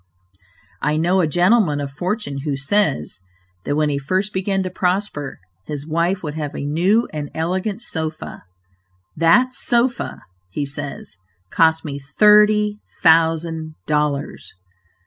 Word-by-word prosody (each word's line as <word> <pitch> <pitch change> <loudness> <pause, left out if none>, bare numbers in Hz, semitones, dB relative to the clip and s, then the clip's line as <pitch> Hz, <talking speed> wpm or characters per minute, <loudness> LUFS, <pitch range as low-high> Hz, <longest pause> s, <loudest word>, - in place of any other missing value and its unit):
I 150 +1 +1
know 180 +4 +2
a 165 - +2
gentleman 175 -1 +3
of 140 -1 -4
fortune 180 -1 -3
who 140 -1 -3
says, 140 - 0 0.5
that 145 - -1
when 150 0 +1
he 140 -1 -1
first 185 +9 -1
began 190 0 0
to 185 - -4
prosper, 180 -6 -2 0.3
his 145 -1 -5
wife 170 +4 0
would 150 -2 -4
have 150 -1 -5
a - - -4
new 180 +10 +2
and 150 -1 -4
elegant 190 +7 -2
sofa. 160 -6 -4 0.7
"That 210 +11 +4
sofa," 240 0 0 0.3
he 140 +10 -3
says, 140 - -7 0.3
"cost 160 0 +3
me 140 -2 -5
thirty 210 +7 +4 0.2
thousand 160 -1 +2
dollars!" 150 -1 -2
160 Hz, 130 wpm, -20 LUFS, 145-195 Hz, 0.7 s, That